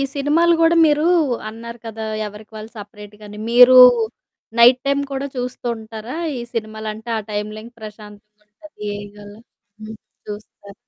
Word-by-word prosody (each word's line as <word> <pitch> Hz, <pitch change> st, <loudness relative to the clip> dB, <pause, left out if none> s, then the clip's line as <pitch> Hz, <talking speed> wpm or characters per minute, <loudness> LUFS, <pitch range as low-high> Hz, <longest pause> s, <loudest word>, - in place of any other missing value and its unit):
సినిమాలు 310 Hz, +5 st, +2 dB
గూడా 330 Hz, +1 st, +4 dB
మీరూ 300 Hz, 0 st, +2 dB, 0.4 s
అన్నారు 235 Hz, +2 st, -9 dB
కదా! 220 Hz, 0 st, -6 dB, 0.2 s
ఎవరికి 210 Hz, +2 st, -12 dB
వాళ్ళు 215 Hz, +1 st, -9 dB
సపరేట్‌గా 210 Hz, 0 st, -12 dB
అని. 210 Hz, -, -10 dB
మీరు 250 Hz, +2 st, +7 dB, 0.8 s
నైట్ 245 Hz, +2 st, +7 dB
టైమ్ 280 Hz, 0 st, +1 dB
కూడా 270 Hz, +1 st, -3 dB
చూస్తూంటారా 235 Hz, -1 st, -5 dB, 0.2 s
ఈ -, -, -5 dB
సినిమాలంటే 220 Hz, 0 st, -6 dB
ఆ -, -, -3 dB
టైమ్‌లింక 215 Hz, +2 st, -6 dB
ప్రశాంతంగా 210 Hz, 0 st, -13 dB
ఉంటది 210 Hz, -3 st, -10 dB, 0.3 s
గాళ్ళ. 205 Hz, 0 st, -12 dB, 0.5 s
హ్మ్. 220 Hz, +1 st, -9 dB, 0.3 s
చూస్తారు. 205 Hz, -1 st, -10 dB
220 Hz, 125 wpm, -19 LUFS, 210-250 Hz, 0.8 s, మీరు